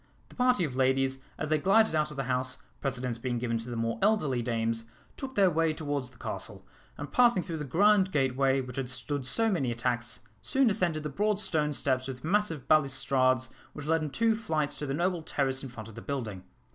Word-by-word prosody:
The - - -16
party 250 -5 +3
of 140 -6 -3
ladies, 135 0 +2 0.2
as - - -3
they 155 -1 +2
glided 220 +6 +4
out 155 -1 +1
of 150 - -9
the 135 - -1
house, 130 0 -1 0.2
precedence 125 -3 -2
being 120 0 -2
given 115 -1 -1
to 115 +2 -7
the 120 - -4
more 115 0 -1
elderly 190 - +2
dames, 115 -1 -1 0.3
took 265 -1 -7
their 195 -4 +5
way 165 0 +2
towards 145 -5 -3
the 125 - -21
castle, - - -5 0.3
and 145 0 -6
passing 240 -7 +4
through 165 - -4
the 150 - -3
grand 190 +6 +4
gateway 135 -1 +2
which 125 -1 -8
had 130 -2 -2
stood 130 +2 -2
so 225 - +2
many 135 -10 0
attacks, 120 -1 -1 0.2
soon 265 -4 +2
ascended 175 -6 0
the 150 - -3
broad 205 +6 0
stone 155 -7 0
steps 130 -2 0
with 125 -2 -7
massive 165 -6 0
balustrades 130 -3 +3 0.2
which 145 - -7
led 165 +1 +2
in 155 - -2
two 225 +8 +2
flights 160 -10 -1
to 150 - -4
the 135 - -1
noble 175 +1 0
terrace 135 -4 -1
in 135 - -6
front 110 -3 -9
of 115 - -11
the 115 - -9
building. 110 -10 -4
140 Hz, 215 wpm, -29 LUFS, 125-170 Hz, 0.3 s, their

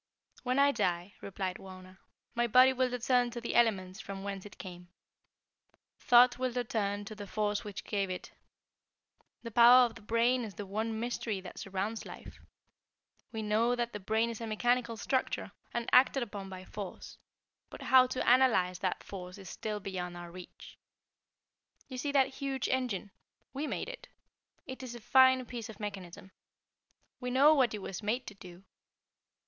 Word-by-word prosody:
"When 255 +1 -1
I 280 0 +5
die," 175 -4 -1
replied 190 -1 -4
Wauna, 185 0 -12 0.3
"my 240 0 +1
body 255 +3 +6
will 255 0 +1
return 245 0 +1
to 240 - -6
the 235 - -4
elements 195 -5 +2
from 195 -1 -7
whence 200 0 -5
it 205 - -16
came. 180 -2 -9 1.1
Thought 245 0 +6
will 255 -1 0
return 210 -4 -2
to 215 - -7
the 205 -1 -8
force 210 0 -1
which 205 -2 -7
gave 200 -2 -1
it. 185 - -6 1.1
The 230 - -6
power 245 +2 +8
of 235 - -4
the 230 - -13
brain 235 +3 +2
is 210 -5 -7
the 205 - -6
one 220 +3 -3
mystery 230 -3 -2
that 185 - -9
surrounds 195 +3 -3
life. - - -11 0.9
We 220 -2 -4
know 225 +3 +2
that 240 -1 -2
the 210 - -5
brain 220 +4 0
is 230 - -8
a 230 - -4
mechanical 235 +1 0
structure 260 +4 -1 0.2
and 235 0 -3
acted 260 +1 +5
upon 200 -4 -7
by 185 -1 -9
force; 200 -2 -8 0.5
but - - -10
how 255 -1 +6
to 255 0 -3
analyze 230 -8 +4
that 185 -1 -2
force 180 -1 -8
is 195 -2 -9
still 215 -1 -4
beyond 180 -3 -5
our 175 0 -9
reach. 180 0 -12 1.1
You 255 -2 -7
see 285 +2 -1
that 275 -2 +3
huge 270 -2 -2
engine? 240 -7 -1 0.4
We 285 +3 -3
made - - -3
it. - - -9 0.6
It 260 0 -8
is 250 -2 -7
a - - -8
fine 260 +2 +5
piece 235 -2 -7
of 220 - -10
mechanism. 190 -3 -7 0.9
We 250 - -4
know 275 +5 +6
what 255 -7 +2
it 205 - -7
was 190 - -5
made 230 +5 -1
to - - -8
do. 185 -2 -13
220 Hz, 175 wpm, -31 LUFS, 195-250 Hz, 1.1 s, power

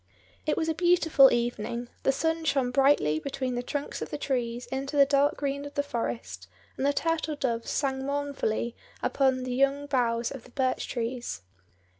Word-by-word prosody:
It 305 - +1
was 320 - 0
a 320 - +1
beautiful 325 -5 +5
evening; 240 0 -1
the - - +3
sun 325 +4 0
shone 270 -5 +1
brightly 250 - +3
between 260 - -3
the 245 - -1
trunks 285 +3 -4
of - - -4
the - - -4
trees 245 -4 -2
into 275 +2 -3
the 280 - +8
dark 280 +1 +2
green 280 0 -2
of 285 0 -9
the 285 - +1
forest, 115 - -4 0.3
and 275 - 0
the - - +4
turtle 320 0 -1
doves 235 -5 -2
sang 265 -2 -1
mournfully 280 -5 -1 0.3
upon 260 -2 +2
the 255 -1 -3
young 275 +2 +2
boughs 240 -4 0
of 270 -4 -8
the - - -16
birch 255 0 -1
trees. 240 - -4
270 Hz, 180 wpm, -28 LUFS, 240-285 Hz, 0.3 s, the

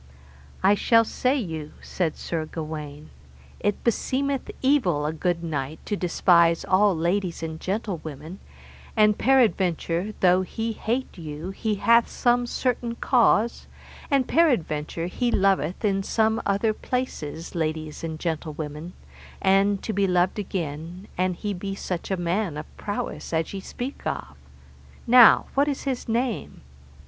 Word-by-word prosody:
I 195 +2 +6
shall 230 +2 +4
say 255 +5 0
you, 160 - -5
said 170 -4 -2
Sir 160 -2 -3
Gawaine, 155 -2 -7 0.5
it 205 0 -1
beseemeth 270 +4 0
evil 230 - +2
a 155 - -1
good 170 +1 -1
knight 150 -2 -3
to 205 - -1
despise 170 -2 +3
all 195 -1 +3
ladies 175 +1 -1
and 160 0 -5
gentlewomen, 175 -5 -5 0.6
and 210 -1 +5
peradventure 205 -6 +2
though 180 0 +4
he 225 +4 -3
hate 235 -1 -3
you 155 +3 -6
he 215 +2 -2
hath 235 +3 +4
some 245 -1 +1
certain 240 -2 -1
cause, 235 -2 +2 0.4
and 275 -3 +2
peradventure 170 - +1
he 240 +7 -1
loveth 190 -3 +1
in 195 -1 +2
some 220 +2 +1
other 200 +2 +2
places 175 - -4
ladies 155 -1 -3
and 160 -1 -4
gentlewomen, 155 0 -4 0.5
and 195 +1 +3
to 220 - -2
be 200 -1 +2
loved 180 +2 +1
again, 170 -1 -5
an 185 0 0
he 205 +3 -3
be 195 +1 -5
such 180 -3 -4
a 190 - 0
man 175 -1 -1
of 150 - -5
prowess 210 +4 -5
as 160 +2 -1
ye 195 - -4
speak 245 +7 -6
of. - - -4 0.7
Now, 245 -1 +8
what 280 +1 +3
is 285 -2 -2
his 260 -4 -3
name? 235 0 -2
190 Hz, 140 wpm, -25 LUFS, 165-230 Hz, 0.7 s, Now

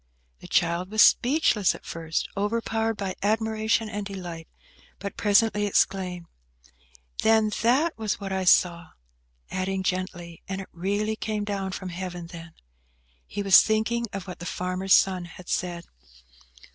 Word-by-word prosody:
The - - -11
child 175 +2 +1
was 215 0 +5
speechless 245 - +3
at - - -14
first, 165 -1 -3
overpowered 225 +2 -1
by 195 -2 -3
admiration 220 +1 +1
and 210 -1 -4
delight, 175 -5 -7 0.5
but 200 0 -6
presently 210 0 +3
exclaimed, 185 -3 0 1.0
"Then 220 -1 +3
that 265 +9 +2
was 215 -3 -2
what 195 -1 -5
I 190 0 -1
saw!" 170 -2 +3 0.6
adding 190 0 -2
gently, 180 -2 -3
"And 190 0 -4
it 195 - -8
really 205 +5 -1
came 215 -1 -3
down 200 -2 -3
from 185 -1 -5
Heaven, 175 -1 -6
then?" 165 -1 -11 0.7
He 205 - -4
was 195 -1 +8
thinking 235 +2 0
of 195 -2 -6
what 180 - -8
the 175 - -6
farmer's 185 +1 +1
son 185 -2 +2
had 175 +1 -13
said. 175 -1 -2
195 Hz, 145 wpm, -26 LUFS, 180-215 Hz, 1.0 s, was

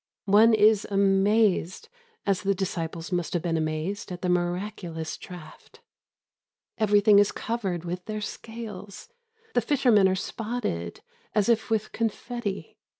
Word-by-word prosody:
One 215 +3 +6
is 215 -1 +4
amazed, 195 -1 +2 0.4
as 195 -2 +1
the 200 -1 +1
disciples 170 -2 -4
must 175 -2 -1
have 175 - -1
been 170 -2 0
amazed 160 +7 -2
at 180 0 -7
the 180 - 0
miraculous 175 -2 -2
draught. 170 -4 -12 1.0
Everything 205 -1 +5
is 205 - +4
covered 195 -7 -3
with 180 +1 -5
their 215 -1 -4
scales. 210 - -8 0.4
The 245 - +3
fishermen 235 -6 +4
are 190 - +1
spotted 210 - -4 0.3
as 210 +1 +2
if 225 -1 +2
with 215 -1 0
confetti. 225 -2 -4
200 Hz, 130 wpm, -26 LUFS, 175-215 Hz, 1.0 s, One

